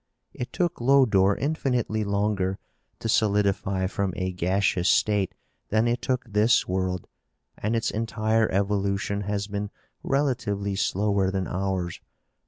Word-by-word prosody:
It 125 - -5
took 175 -8 -1
Lodore 115 -7 +4
infinitely 125 -7 0
longer 100 -2 0 0.4
to - - -4
solidify 100 -3 +1
from 95 0 -1
a 95 0 -1
gaseous 90 0 +1
state 105 -3 +2 0.3
than 110 +2 +2
it 120 +1 0
took 130 0 -1
this 105 +2 +3
world, 95 0 -1 0.5
and 110 +3 -1
its 115 - 0
entire 110 0 0
evolution 100 +1 0
has 100 0 -2
been 100 0 -4 0.3
relatively 115 -8 0
slower 100 0 +1
than 95 -1 -1
ours. 95 -2 -2
100 Hz, 125 wpm, -26 LUFS, 95-110 Hz, 0.5 s, Lodore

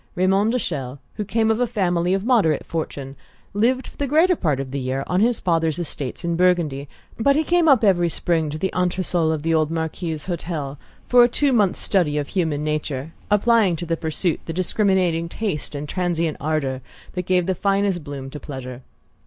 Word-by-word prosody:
Raymond 195 +4 +2
de 250 - +1
Chelles, 140 - -4 0.2
who 210 - -3
came 220 +2 +1
of 220 - 0
a 245 - +2
family 180 -5 +1
of 195 +1 -3
moderate 210 - +2
fortune, 140 -4 -5 0.4
lived 245 +6 +1
for - - -12
the 285 - -1
greater 325 +6 +4
part 150 - 0
of 135 -1 -5
the 140 - -2
year 130 +1 -2
on 180 - 0
his 235 +3 +2
father's 165 -3 +1
estates 150 -3 -5
in 170 0 0
Burgundy; 165 -6 +1 0.3
but 280 +5 +4
he 310 - +2
came 345 +1 +2
up 270 -6 +5
every 175 -4 +4
spring 165 -2 0
to 150 - -4
the 190 +4 -2
entresol 180 -2 +1
of 155 -2 -2
the 165 0 +1
old 155 -1 +2
Marquis's 160 -1 -3
hotel 160 -6 -4 0.3
for 245 -1 +7
a - - +6
two 275 +2 +1
months' 205 -6 +2
study 170 -7 +1
of 145 -1 -2
human 160 -6 -1
nature, 150 -1 -3 0.2
applying 210 -3 +3
to 170 - -5
the 165 0 0
pursuit 160 +1 -1
the 165 - -3
discriminating 185 -2 +1
taste 170 -8 -4
and 145 +1 -4
transient 170 -2 -1
ardour 145 -4 -1 0.3
that 180 -1 -4
give 180 -1 +2
the 190 - +1
finest 195 -2 0
bloom 140 -2 -7
to 150 - -7
pleasure. 130 -3 -7
170 Hz, 200 wpm, -22 LUFS, 150-200 Hz, 0.4 s, for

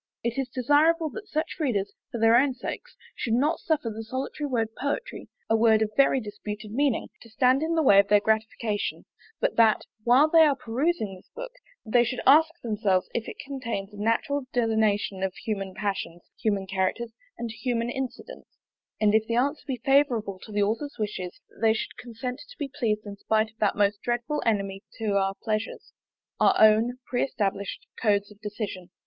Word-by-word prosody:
It 235 +3 -1
is 265 -1 -2
desirable 305 +5 +3
that 415 - -8
such 310 +1 -2
readers, 205 -10 -1 0.2
for 235 - -4
their 225 +1 +5
own 260 +1 +3
sakes, - - -7 0.2
should 230 - -1
not 285 +6 +1
suffer 305 -8 -1
the 220 +1 -6
solitary 265 +5 -4
word 230 -5 0
Poetry, 285 - -4 0.2
a 225 - +3
word 220 -1 +4
of 215 - -3
very 275 -1 +4
disputed 210 -1 -7
meaning, 270 0 0
to 230 - -14
stand 255 +4 +3
in 325 +1 0
the 320 - +2
way 200 -7 +7
of 200 - +4
their 205 0 +5
gratification; 220 0 -1 0.3
but - - 0
that, 225 -2 +5 0.2
while 250 +6 +6
they 330 +1 +5
are 300 -3 +5
perusing 250 - -1
this 185 - -15
book, - - -6 0.3
they 240 +2 +4
should 245 +1 -3
ask 310 +4 +7
themselves 210 -5 0
if 235 - -2
it - - -9
contains 230 -7 -4
a - - -11
natural 255 +5 0
delineation 220 -4 +1
of 190 -1 -1
human 195 -4 -4
passions, 190 -4 -3
human 205 -3 -1
characters, 190 +5 -1 0.3
and 235 -1 -4
human 235 +1 -2
incidents; 265 - -7 0.4
and 210 -1 +3
if 220 0 +3
the 230 - -1
answer 280 +5 +1
be 260 -2 -2
favourable 245 -8 +2
to 215 - -11
the 205 0 +1
author's 235 +8 -2
wishes, 205 -5 -4
that - - -21
they 220 -1 +5
should - - -4
consent 250 +2 -6
to - - -14
be 280 -3 -4
pleased 215 -4 0
in 200 -1 -8
spite 220 +1 +1
of 220 - -39
that 210 -2 +2
most 205 0 +1
dreadful 240 +5 -1
enemy 195 -3 0
to 215 -3 -2
our 195 0 +1
pleasures, 215 0 -3 0.5
our - - +5
own 220 +3 +5
pre 245 - -1
established 200 -6 -2 0.2
codes 205 -2 +2
of 210 0 -17
decision. 205 -4 -5
225 Hz, 190 wpm, -26 LUFS, 210-260 Hz, 0.5 s, way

